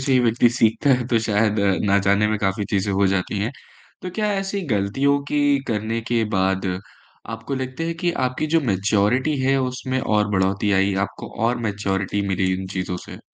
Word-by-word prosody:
से 135 0 0
ही 130 - +5
व्यक्ति 120 0 +3
सीखता 120 +3 +2
है, 125 -2 +2
तो 120 -2 +2
शायद 110 -1 +1 0.3
ना 100 0 +3
जाने 100 +2 +4
में 110 0 0
काफ़ी 100 +1 -1
चीज़ें 100 0 0
हो 100 +1 +3
जाती 95 +2 -1
हैं। 105 +4 -1 0.5
तो 180 - -4
क्या 210 0 0
ऐसी 195 0 -2
गलतियों 135 +9 +1
की 145 -1 +2
करने 110 +1 -1
के 115 -2 +2
बाद 95 0 +1 0.7
आपको 115 +5 -5
लगता 130 +4 -4
है 165 - -2
कि 175 - +2 0.2
आपकी 130 +5 -2
जो 165 +1 +2
मैच्योरिटी 105 +6 +1
है, 135 +1 +3
उसमें 130 0 -2
और 105 -3 +1
बढ़ोतरी 95 +1 +1
आई, 95 +1 +2
आपको 95 +1 -3 0.2
और 125 - +1
मैच्योरिटी 100 -1 -1
मिली 95 -1 +1
इन 95 +1 -5
चीज़ों 90 -1 -2
से? - - -9
110 Hz, 190 wpm, -22 LUFS, 100-130 Hz, 0.7 s, ही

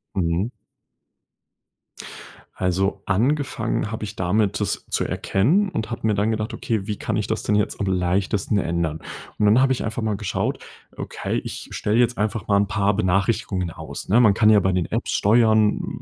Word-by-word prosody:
Mhm. 90 +4 0 2.1
Also 95 +2 0
angefangen 115 0 0
habe 110 -1 -5
ich 105 +1 -6
damit, 100 +3 +1
das - - -2
zu - - 0
erkennen 165 - +1
und 110 -8 -4
habe 115 - -4
mir 110 - +3
dann 105 +2 +1
gedacht, 110 +2 -3
okay, 110 -3 -2
wie 105 - -3
kann - - -3
ich - - -1
das - - -2
denn 105 - +1
jetzt 105 - 0
am 100 - -1
leichtesten 95 +3 0
ändern? 85 -4 -1 0.4
Und 105 - +2
dann 110 +5 +5
habe 135 0 +3
ich 130 - 0
einfach 110 +2 -3
mal 110 -2 -1
geschaut 95 -3 -2 0.4
okay, - - -3
ich - - -7
stelle 105 +2 0
jetzt 120 0 +2
einfach 105 -1 -2
mal 100 - +4
'n 100 - +1
paar 100 0 +1
Benachrichtigungen 95 -2 0
aus, 80 +3 -8
ne? 110 - +5
Man 110 -5 +6
kann 105 +2 +4
ja 105 -1 +6
bei 95 0 +1
den 90 -2 0
Apps - - -1
steuern, 110 0 +2
105 Hz, 185 wpm, -22 LUFS, 95-110 Hz, 2.1 s, Man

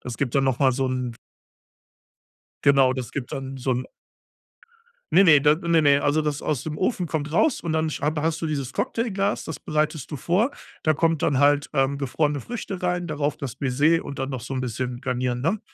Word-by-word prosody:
Das 120 -2 -6
gibt 125 0 -2
dann 135 -1 +3
noch 130 -2 +1
mal 135 -2 +5
so 135 +1 0
'n 125 -2 -2 1.5
Genau, 135 -2 +5
das 125 -4 -5
gibt 135 -3 -5
dann 135 0 -5
so 130 0 -2
'n 125 0 -1 1.3
Ne, 195 - +7
ne, 150 -5 +7
da 150 +1 +5
ne, 170 0 +2
ne, 145 -2 +4
also 145 +2 +2
das 150 -2 -2
aus 145 -5 -1
dem 150 -1 -4
Ofen 185 -1 0
kommt 150 -2 -3
raus 280 - +2
und 170 - -2
dann 160 0 +1
hab 150 +1 -2
hast 165 +2 -1
du - - 0
dieses 140 -4 -3
Cocktailglas, 205 -3 -1
das 160 - -6
bereitest 155 -1 -2
du 150 - -4
vor. 185 - +1 0.3
Da 155 - +3
kommt 165 0 +1
dann 135 - +2
halt, 145 +1 +3
ähm, 135 -1 +1
gefrorene 145 +2 -1
Früchte 195 - -6
rein, 180 -1 0
darauf 150 -2 -2
das 130 -3 -5
Baiser 145 +6 +2
und 140 - -7
dann 135 0 -2
noch 130 -3 -5
so 130 - -7
'n 130 - -1
bisschen 125 0 -3
garnieren, 125 -1 -1
ne? 190 - 0
145 Hz, 210 wpm, -24 LUFS, 130-160 Hz, 1.5 s, Ne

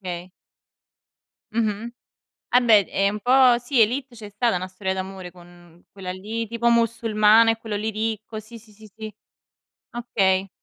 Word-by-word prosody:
Okay. 180 -1 -7 1.2
Mh-mh, 220 0 -1 0.6
ah 250 - +4
beh, 220 -5 +5
è 195 0 0
un 210 +1 -5
po', 250 0 +4
sì, 245 +1 -1
"Élite", 250 +3 0
c'è 210 -2 -10
stata 215 -1 0
'na 185 +1 -5
storia 190 0 -4
d'amore, 190 -1 -7
con 175 -1 -18
quella 190 -2 -7
lì, 215 +5 -5
tipo, 235 +1 -2
musulmana 225 -1 +4
e 225 - -3
quello 220 -2 -5
lì, 215 +2 -2
ricco. 220 0 -4
Sì, 220 +2 -12
sì, 220 -1 -19
sì, 215 +1 -16
sì. 215 -1 -8 0.8
Okay. 195 -5 0
215 Hz, 160 wpm, -23 LUFS, 190-230 Hz, 1.2 s, beh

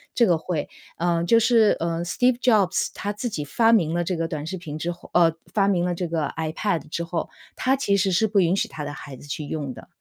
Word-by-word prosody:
这 235 - +5
个 170 -5 +2
会 160 -2 -3 0.3
呃， 170 0 +1
就 230 +7 +5
是， 225 -2 +4
呃， 165 0 -1
Steve 245 +7 +1
Jobs 205 -7 +3
他 205 +2 -3
自 230 +4 -3
己 150 -9 -4
发 225 +9 +3
明 170 -8 +3
了 175 0 0
这 180 +1 -2
个 165 0 -1
短 155 -1 -5
视 190 +3 -4
频 155 -4 -7
之 170 +2 -2
后 175 - -12
呃， 165 -2 +4 0.2
发 200 -2 +3
明 180 -3 +2
了 180 - 0
这 175 +1 -3
个 160 -3 -1
iPad 160 +1 -2
之 170 - -3
后， 170 0 -3 0.3
他 260 +1 +2
其 230 -7 +1
实 195 0 +2
是 185 +5 +3
不 205 -1 +2
允 180 +1 +3
许 - - 0
他 150 - -7
的 145 - -4
孩 140 -1 -9
子 145 - -13
去 145 +2 -4
用 145 -2 -4
的。 - - -11
175 Hz, 330 characters per minute, -24 LUFS, 160-200 Hz, 0.3 s, 这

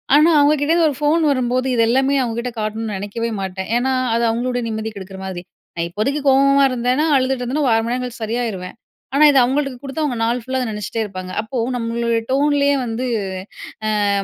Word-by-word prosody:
ஆனா, 305 +3 +6
அவுங்க 290 +1 +5
கிட்டேந்து 325 +2 +3
ஒரு 285 - -4
ஃபோன் 300 +3 +2
வரும்போது, 255 0 0
இத 230 - +3
எல்லாமே 270 +3 +2
அவுங்க 230 -2 -3
கிட்ட 245 +1 -3
காட்டணும்னு 215 0 -3
நினைக்கவே 205 +4 -3
மாட்டேன். 190 0 -5
ஏன்னா, 260 +2 0 0.2
அது 235 - +1
அவுங்களுடைய 245 +1 -2
நிம்மதி 220 0 -3
கெடுக்கிற 190 -1 -9
மாதிரி. 185 -2 -5 0.3
நான் 170 0 -2
இப்போதைக்கு 220 +11 -1
கோவமா 275 +1 +5
இருந்தேன்னா, 250 +5 +1
அழுதுட்டு 260 -1 +1
இருந்தேனா 275 +5 -1
ஒரு 235 - +4
1/2 225 - +2
மணி 235 - -1
நேரங்கழிச்சு 250 -2 -4
சரியாயிருவேன். 220 -5 -3 0.4
ஆனா, 300 - +5
இதை 275 - +5
அவுங்கள்ட்ட 275 +2 0
குடுத்தா, 280 +3 -3
அவுங்க 255 -5 -1
நாள் 235 +2 0
ஃபுல்லா 260 +1 -2
அத 250 - -2
நினச்சிட்டே 210 +2 -3
இருப்பாங்க. 185 -2 -7
அப்போ 225 +4 -6 0.2
நம்மளோட 235 0 -1
டோன்லயே 285 0 +3
வந்து 235 +2 -3 1.0
அ - - +2
245 Hz, 190 wpm, -19 LUFS, 220-275 Hz, 1.0 s, ஆனா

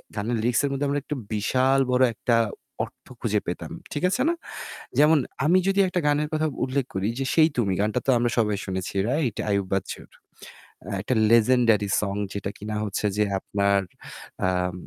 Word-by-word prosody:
গানের 115 +3 -1
লিরিক্সের 120 +5 +1
মধ্যে 140 +1 -1
আমরা 145 +1 0
একটা 150 - -4 0.2
বিশাল 130 +6 +2
বড় 125 +1 +4
একটা 115 +2 +1 0.5
অর্থ - - -11 0.2
খুঁজে - - +1
পেতাম। - - -4 0.2
ঠিক 145 - -3
আছে 245 - 0
না? - - +2 0.7
যেমন, 150 +1 +6 0.3
আমি 175 +5 +5
যদি 195 0 +2
একটা 180 0 -1
গানের 150 +1 +2
কথা 155 0 +1 0.2
উল্লেখ 135 0 -1
করি 95 +2 -1
যে 135 - -1
'সেই 160 -1 +5
তুমি', 100 -6 +1
গানটা 105 +4 +1
তো - - +4
আমরা 120 0 +1
সবাই 105 -3 +2
শুনেছি, 95 -1 -4
রাইট? 130 -4 0
আইয়ুব 100 -1 +1
বাচ্চুর। 95 -1 -4 0.9
একটা 120 - -1 0.2
লেজেন্ডারি 115 -3 +4
সং 100 -1 -2 0.2
যেটা 100 -1 -3
কিনা 105 +1 -5
হচ্ছে 105 0 -2
যে 105 - +4 0.2
আপনার 100 0 +1 0.7
আম 90 -1 0
115 Hz, 170 wpm, -25 LUFS, 100-140 Hz, 0.9 s, যেমন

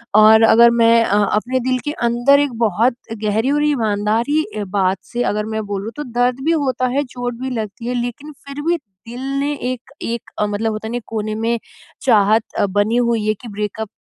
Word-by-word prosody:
और 220 +1 +7
अगर 235 +1 +7
मैं 230 0 +5
अ, 205 +1 +2
अपने 240 +6 0
दिल 255 -1 +1
के 295 - -1 0.2
अंदर 240 +4 +4
एक 285 -4 0
बहुत 230 +6 +1 0.3
गहरी 220 +5 +1
और 295 +1 +2
ईमानदारी 230 +2 +1 0.3
बात 190 -1 +2 0.2
से 245 0 0
अगर 210 0 -2
मैं 220 - -2
बोलूँ 200 +3 -4
तो 295 - -3
दर्द 245 +1 0
भी 325 - +3 0.2
होता 255 0 0
है, 290 - +2
चोट 245 -1 -5
भी 260 - -2
लगती 215 +3 -7
है 250 - -1
लेकिन 245 +5 -6 0.2
फिर 280 +1 -6
भी 345 - +3 0.3
दिल 240 +2 -7 0.2
ने 290 +1 0 0.2
एक 255 +2 -12
एक 235 0 -4
मतलब 210 +2 0
होता 215 +1 -5
नहीं 245 +1 -3
कोने 215 -1 -3
में 235 0 +1 0.4
चाहत 220 -3 +4 0.2
अ, 205 - +3
बनी 205 +4 +1
हुई 235 -3 +1
है 215 - +3
कि 240 - -9
ब्रेकअप 210 +1 -4
230 Hz, 195 wpm, -19 LUFS, 215-255 Hz, 0.4 s, और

